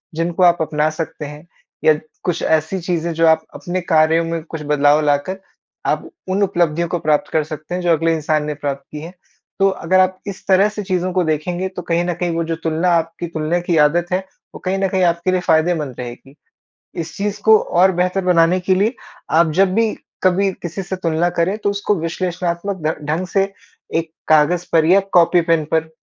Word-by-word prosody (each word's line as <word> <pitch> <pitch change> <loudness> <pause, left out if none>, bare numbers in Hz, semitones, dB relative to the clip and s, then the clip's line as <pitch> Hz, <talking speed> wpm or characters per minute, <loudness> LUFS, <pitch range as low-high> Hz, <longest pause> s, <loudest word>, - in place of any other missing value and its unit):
जिन 165 +2 -1
को 185 - +1
आप 175 -1 +5
अपना 155 -1 +1
सकते 155 -1 -5
हैं, 150 +3 -10 0.4
या 155 - +6 0.3
कुछ 175 -2 -1
ऐसी 160 +4 +1
चीज़ें 170 -1 -2
जो 165 0 +3
आप 160 0 +4
अपने 180 0 -3
कार्यों 160 -1 +3
में 165 -1 -3
कुछ 160 -1 -7
बदलाव 145 0 +3
लाकर 145 +6 0 0.5
आप - - -1 0.2
उन 195 +2 +1
उपलब्धियों 170 -3 +1
को 175 - -1
प्राप्त 150 -1 +1
कर 155 - +2
सकते 155 +3 -6
हैं 180 - -3
जो 175 -1 +1
अगले 165 +1 +1
इंसान 155 -1 0
ने 150 - -2
प्राप्त 140 -1 -4
की 150 - -6
है। 170 +3 -9 0.5
तो 195 - +5
अगर 185 0 +1
आप 185 0 +2
इस 195 -2 -7
तरह 195 +2 +4
से 210 0 -6
चीज़ों 185 -1 -1
को 185 0 +2
देखेंगे 175 +4 -1
तो 185 -1 -7
कहीं 170 0 0
न 175 - -1
कहीं 175 +1 -2
वो 165 - 0
जो 165 0 -2
तुलना 165 +2 +1
आपकी 165 +1 -4
तुलना 160 +1 -1
की 175 -1 0
आदत 170 +3 +1
है 185 - +2 0.4
वो - - -8
कहीं 185 +1 0
न 195 - +1
कहीं 185 0 +1
आपके 170 +1 +1
लिए 185 - +1
फ़ायदेमंद 160 -5 +1
रहेगी। 125 +3 -9 0.7
इस 160 -2 -8
चीज़ 205 +1 -2
को 220 0 +8
और 185 +2 +3
बेहतर 185 +2 0
बनाने 175 0 +4
के 185 +1 +1
लिए, 210 +6 +1 0.4
आप 160 +1 +4
जब 190 +2 +3
भी 225 -1 +2 0.3
कभी 190 +1 +3
किसी 175 +3 -5
से 190 +1 -4
तुलना 170 -1 0
करें 175 +3 0
तो 205 - -1
उसको 200 +1 0
विश्लेषणात्मक 175 +2 -3
ढं 155 -1 -2
ढंग 160 +5 -2
से 195 +2 0 0.4
एक 165 -1 -1 0.2
कागज 155 +3 +3
पर 160 -1 +4
या 185 +4 +5
कॉपी-पेन 165 -2 +4
पर 160 0 +1
170 Hz, 205 wpm, -19 LUFS, 160-185 Hz, 0.7 s, को